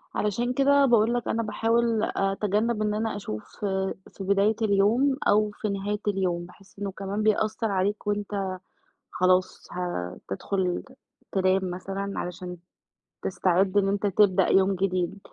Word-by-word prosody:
علشان 235 +4 0
كده 280 +1 +4
باقول 235 -1 +4
لك 240 -1 -2
أنا 230 0 0
باحاول 225 +1 +1
أتجنب 210 +3 0
إن 210 -1 +1
أنا 220 0 -1
أشوف 105 - -7 0.5
في - - -26
بداية 200 +2 +3
اليوم 220 +7 +3
أو 210 +1 +3
في 215 - -3
نهاية 200 +1 -2
اليوم، 180 -3 0
باحس 195 +3 -18
إنه 200 -1 -3
كمان 195 +2 -3
بيأثّر 215 0 +1
عليك 200 +3 -1
وأنت 205 -2 -2 0.6
خلاص 185 0 +1
هتدخل 175 - -3
ت 265 - -16 0.4
تنام 185 -1 +2
مثلًا، 195 +2 -4
علشان 180 0 -5 0.7
تستعد 185 +1 +1
إن 195 -1 +4
أنت 205 +1 0
تبدأ 195 -1 +4
يوم 190 0 +4
جديد، 185 0 -1
200 Hz, 135 wpm, -26 LUFS, 185-215 Hz, 0.7 s, كده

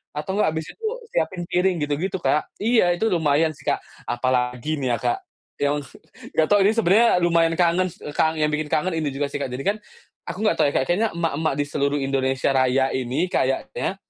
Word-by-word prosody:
atau 150 +6 -3
enggak 210 - +2
habis 160 0 -3
itu 450 - -10 0.3
siapin 175 +2 -1
piring, 180 +1 +1
gitu 145 0 -1
gitu, 190 +2 -2
Kak. 150 -1 0
Iya, 220 -5 +3
itu 220 +6 0
lumayan 160 -2 +2
sih, 140 - -17
Kak. - - +1 0.3
Apalagi 125 +3 0
ini 130 -3 -1
ya, 120 - +1
Kak. 370 - 0 0.4
Yang 145 0 +2
un 145 - -5 0.5
enggak 160 - +3
tahu 205 - +6
ini 205 - +5
sebenarnya 225 +2 +4
lumayan 170 -1 +3
kangen 175 +2 +2
s 180 - -18 0.2
kangen, 160 0 +2
yang 150 - +1
bikin 150 0 -1
kangen 180 +5 +1
ini 155 -2 -1
juga 140 +1 -1
sih, 145 - -3
Kak. 140 - -2
Jadi 130 +2 -4
kan, 205 +6 +1 0.5
aku - - -5
enggak 215 - +3
tahu - - +5
ya, - - -13
kayaknya 180 +11 +1
emak-emak 160 -2 0
di 145 - +1
seluruh 145 0 0
Indonesia 135 0 0
Raya 130 0 +2
ini 130 +7 -1
kayaknya, 130 +4 -1
155 Hz, 210 wpm, -23 LUFS, 135-180 Hz, 0.5 s, tahu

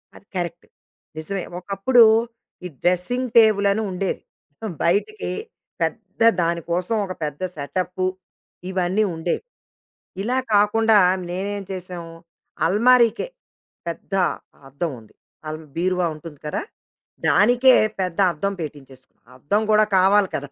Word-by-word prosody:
అది - - -16
కరెక్ట్. 175 -1 -4 0.5
నిజమే. 180 +4 -4 0.2
ఒకప్పుడు 200 +6 +4 0.6
ఈ - - -1 0.2
డ్రెసింగ్ 180 +9 0
టేబుల్ 215 -3 +5
అని 220 - 0
ఉండేది. 185 +1 -2 0.3
మొత్తం 205 +7 -7
బయటికి 210 - 0 0.5
పెద్ద 190 +6 -3 0.2
దాని 170 0 0
కోసం 180 +6 0
ఒక 185 - -5
పెద్ద 150 +1 -4
సెటప్పు, 180 +5 -3 0.6
ఇవన్నీ 185 +3 +1
ఉండేవి. 160 +2 -2 0.8
ఇలా 245 +5 0 0.2
కాకుండా 210 +1 +4 0.3
మేమేంచేశాం 185 -2 -5 0.6
అల్మారికే 235 - +4 0.6
పెద్ద 170 +3 -6 0.5
అద్దం 140 +6 -3
ఉంది. 110 - -19 0.3
అల్ 155 +1 -4 0.2
బీరువా 180 +1 +1
ఉంటుంది 150 -1 -11
కదా! - - -2 0.7
దానికే 250 +1 +5 0.3
పెద్ద 180 -1 -2
అద్దం 195 +5 -2
పెట్టించేసుకున్నాం. 135 -4 -10
అద్దం 205 +11 0
కూడా 215 0 +6
కావాలి 195 +2 +5
కదా! 140 0 -4
185 Hz, 110 wpm, -22 LUFS, 170-210 Hz, 0.8 s, కూడా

